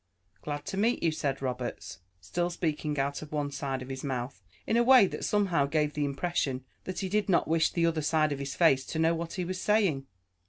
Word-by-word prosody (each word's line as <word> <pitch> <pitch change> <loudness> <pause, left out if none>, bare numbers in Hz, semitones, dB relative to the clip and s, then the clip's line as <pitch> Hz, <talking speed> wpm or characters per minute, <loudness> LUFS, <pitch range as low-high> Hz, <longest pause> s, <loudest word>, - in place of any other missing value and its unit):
"Glad 145 -1 -5
to 195 0 -4
meet 225 +5 +1
you," 165 - +3
said 140 -3 -2
Roberts, 125 -6 -4 0.2
still 175 - -2
speaking 155 -3 -2
out 140 +1 -1
of 155 - -9
one 145 -2 -2
side 135 -2 -3
of 125 - -11
his 135 0 -5
mouth, 125 -6 -4 0.2
in - - 0
a 235 - +5
way 250 -3 +7
that - - -5
somehow 185 -9 +2
gave 150 0 0
the 150 0 0
impression 140 -3 -2 0.2
that 185 +1 -4
he 190 - -1
did 210 +2 0
not 180 - +3
wish 160 +1 +2
the 170 -1 +1
other 165 -1 +1
side 155 0 +2
of 140 - -3
his 140 -1 -4
face 135 -6 +4
to - - -4
know 160 +1 +3
what 165 0 -4
he 180 -2 -2
was 185 +1 -4
saying. 190 -11 +2
155 Hz, 230 wpm, -29 LUFS, 140-175 Hz, 0.2 s, way